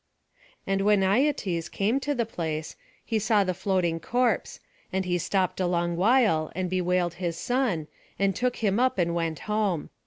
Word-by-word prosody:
And 195 Hz, 0 st, 0 dB
when 205 Hz, 0 st, +4 dB
Aietes 195 Hz, -, +1 dB
came 220 Hz, +7 st, 0 dB
to 285 Hz, +1 st, -2 dB
the 235 Hz, -2 st, 0 dB
place, 160 Hz, -7 st, -4 dB, 0.3 s
he 225 Hz, -2 st, 0 dB
saw 215 Hz, -1 st, +3 dB
the 185 Hz, -1 st, -1 dB
floating 180 Hz, -3 st, 0 dB
corpse; 240 Hz, +4 st, 0 dB, 0.3 s
and 190 Hz, 0 st, -1 dB
he 175 Hz, -1 st, 0 dB
stopped 185 Hz, +1 st, 0 dB
a 185 Hz, -, +1 dB
long 175 Hz, -1 st, 0 dB
while, 200 Hz, -5 st, +3 dB
and 185 Hz, 0 st, -2 dB
bewailed 180 Hz, -1 st, +1 dB
his 170 Hz, -2 st, -2 dB
son, 245 Hz, -, 0 dB, 0.3 s
and 195 Hz, -1 st, +1 dB
took 250 Hz, +4 st, 0 dB
him 205 Hz, -1 st, 0 dB
up, 255 Hz, -2 st, +2 dB
and 170 Hz, -2 st, +1 dB
went 165 Hz, -2 st, -2 dB
home. 210 Hz, -7 st, -1 dB
190 Hz, 175 wpm, -26 LUFS, 170-220 Hz, 0.3 s, when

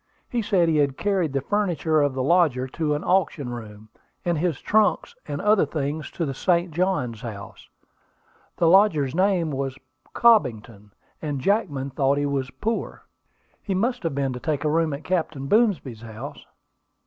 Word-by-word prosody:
He 240 Hz, -, 0 dB
said 190 Hz, -5 st, +2 dB
he 160 Hz, -2 st, +2 dB
had 140 Hz, -2 st, +1 dB
carried 190 Hz, -7 st, 0 dB
the 135 Hz, 0 st, -1 dB
furniture 170 Hz, -3 st, +1 dB
of 145 Hz, -2 st, +1 dB
the 130 Hz, -, -1 dB
lodger 145 Hz, -5 st, +2 dB
to 150 Hz, +1 st, -1 dB
an 145 Hz, -, -4 dB
auction 170 Hz, -8 st, +1 dB
room, 110 Hz, -3 st, -9 dB, 0.4 s
and 175 Hz, -1 st, +1 dB
his 170 Hz, -3 st, -1 dB
trunks 215 Hz, -, +1 dB
and -, -, -4 dB
other 210 Hz, -1 st, +4 dB
things 150 Hz, +1 st, -3 dB
to 170 Hz, -, -2 dB
the 135 Hz, -, -3 dB
St. 175 Hz, +4 st, +1 dB
Johns 150 Hz, -, -1 dB
House. 110 Hz, -4 st, -9 dB, 0.9 s
The 170 Hz, -, +3 dB
lodger's 165 Hz, -7 st, +4 dB
name 185 Hz, -3 st, +1 dB
was 135 Hz, -1 st, -3 dB, 0.4 s
Cobbington; 115 Hz, -, +2 dB, 0.3 s
and 145 Hz, -3 st, -3 dB
Jackman 145 Hz, -, 0 dB
thought 135 Hz, +1 st, +1 dB
he 145 Hz, -, 0 dB
was 135 Hz, -2 st, -1 dB
poor." 225 Hz, -, -4 dB, 0.6 s
"He 195 Hz, -, -2 dB
must 240 Hz, +6 st, 0 dB
have 165 Hz, -5 st, -2 dB
been, 135 Hz, -2 st, -1 dB
to 125 Hz, -, -6 dB
take 150 Hz, +1 st, -2 dB
a 150 Hz, -, +1 dB
room 165 Hz, 0 st, +1 dB
at 140 Hz, +2 st, -5 dB
Captain 160 Hz, -5 st, -2 dB
Boomsby's 180 Hz, -, +1 dB
house." 110 Hz, -1 st, -9 dB
155 Hz, 170 wpm, -24 LUFS, 135-185 Hz, 0.9 s, other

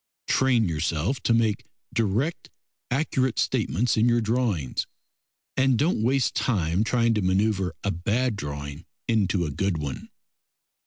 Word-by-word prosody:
Train 125 Hz, -5 st, +3 dB
yourself 80 Hz, -, -1 dB
to -, -, +1 dB
make 110 Hz, -2 st, +1 dB, 0.3 s
direct, 115 Hz, -, -1 dB, 0.4 s
accurate 130 Hz, -2 st, 0 dB
statements 115 Hz, +7 st, +1 dB
in 115 Hz, +2 st, +4 dB
your 120 Hz, 0 st, +3 dB
drawings, 110 Hz, -, -1 dB, 0.7 s
and 130 Hz, -2 st, +3 dB
don't 150 Hz, -3 st, +1 dB
waste 130 Hz, +3 st, +2 dB
time 90 Hz, -5 st, +1 dB
trying 115 Hz, +1 st, +2 dB
to 105 Hz, -, 0 dB
manoeuvre 95 Hz, 0 st, +1 dB
a 100 Hz, -, +1 dB
bad 110 Hz, +8 st, 0 dB
drawing 70 Hz, -1 st, -6 dB, 0.2 s
into 100 Hz, -5 st, +1 dB
a 75 Hz, -, -3 dB
good 95 Hz, +3 st, -1 dB
one. 70 Hz, -4 st, -5 dB
110 Hz, 135 wpm, -25 LUFS, 90-120 Hz, 0.7 s, in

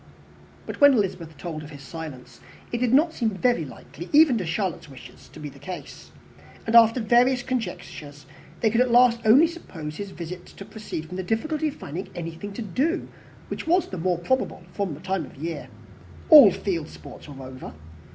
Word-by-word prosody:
But -, -, -7 dB
when 285 Hz, -1 st, +8 dB
Elizabeth 180 Hz, -7 st, -2 dB
told 160 Hz, -2 st, -6 dB
of 150 Hz, -, -10 dB
his 145 Hz, -2 st, -11 dB
silence, 135 Hz, -6 st, -9 dB, 0.3 s
it 235 Hz, -, -2 dB
did 245 Hz, -1 st, +1 dB
not 310 Hz, +5 st, +4 dB
seem 230 Hz, -3 st, 0 dB
very 215 Hz, -2 st, +1 dB
likely, 155 Hz, +4 st, -10 dB
even 300 Hz, -3 st, +6 dB
to 180 Hz, -, -4 dB
Charlotte's 175 Hz, -2 st, -3 dB
wishes, 125 Hz, -2 st, -14 dB
to -, -, -12 dB
be 150 Hz, -, -6 dB
the 140 Hz, -1 st, -12 dB
case; 180 Hz, +6 st, -9 dB, 0.6 s
and, 225 Hz, -, 0 dB
after 230 Hz, +1 st, +7 dB
various 245 Hz, +3 st, +3 dB
conjectures, 175 Hz, -, -5 dB, 0.4 s
they 220 Hz, -, +3 dB
could 230 Hz, +2 st, +3 dB
at 250 Hz, -, +2 dB
last 240 Hz, 0 st, +5 dB
only 255 Hz, +9 st, +7 dB
suppose 165 Hz, -, -7 dB
his 200 Hz, -1 st, -5 dB
visit 175 Hz, 0 st, -8 dB
to 195 Hz, -, -11 dB
proceed 210 Hz, -7 st, -7 dB
from 180 Hz, +3 st, -8 dB
the 190 Hz, -, -3 dB
difficulty 305 Hz, -, -1 dB
of 295 Hz, -, -4 dB
finding 175 Hz, -, -7 dB
anything 170 Hz, +4 st, -6 dB
to 230 Hz, -, -5 dB
do, 275 Hz, -, -1 dB, 0.4 s
which -, -, -5 dB
was 355 Hz, +3 st, +2 dB
the 185 Hz, -, -6 dB
more 180 Hz, +1 st, 0 dB
probable 185 Hz, +1 st, -1 dB
from 195 Hz, -7 st, -2 dB
the -, -, -12 dB
time 190 Hz, -1 st, -2 dB
of -, -, -12 dB
year. 165 Hz, +3 st, -5 dB, 0.6 s
All 295 Hz, -9 st, +11 dB
field 170 Hz, -4 st, -3 dB
sports -, -, -12 dB
were 135 Hz, -2 st, -9 dB
over. 130 Hz, 0 st, -9 dB
190 Hz, 190 wpm, -25 LUFS, 160-245 Hz, 0.6 s, All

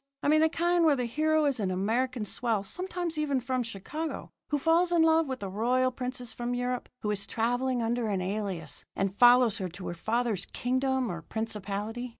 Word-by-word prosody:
I -, -, +2 dB
mean 310 Hz, +1 st, +5 dB
the 320 Hz, -, +5 dB
kind 345 Hz, +1 st, +2 dB
where 310 Hz, -3 st, +5 dB
the 250 Hz, -2 st, -1 dB
hero 310 Hz, +5 st, +2 dB
is 275 Hz, -4 st, +1 dB
an 195 Hz, -3 st, 0 dB
American 225 Hz, +5 st, 0 dB
swell 225 Hz, -1 st, 0 dB
sometimes 350 Hz, -, -3 dB
even 285 Hz, -3 st, +1 dB
from 255 Hz, 0 st, -1 dB
Chicago 245 Hz, +9 st, -5 dB, 0.2 s
who 295 Hz, -, 0 dB
falls 330 Hz, +4 st, +3 dB
in 340 Hz, -2 st, +4 dB
love 320 Hz, -1 st, +4 dB
with 260 Hz, -4 st, -4 dB
a -, -, -2 dB
royal 245 Hz, +6 st, +1 dB
princess 250 Hz, -1 st, -4 dB
from 240 Hz, 0 st, -3 dB
Europe 245 Hz, 0 st, -2 dB
who 210 Hz, -, -1 dB
is 200 Hz, -1 st, -2 dB
travelling 245 Hz, +2 st, 0 dB
under 235 Hz, 0 st, 0 dB
an 200 Hz, -3 st, 0 dB
alias, 185 Hz, -4 st, -3 dB
and 195 Hz, 0 st, -1 dB
follows 245 Hz, -2 st, +6 dB
her 185 Hz, -2 st, -3 dB
to 180 Hz, +2 st, -8 dB
her -, -, -3 dB
father's 220 Hz, +2 st, -1 dB
kingdom 260 Hz, -1 st, 0 dB
or 170 Hz, -1 st, -5 dB
principality? 220 Hz, +4 st, -4 dB
245 Hz, 195 wpm, -29 LUFS, 210-280 Hz, 0.2 s, follows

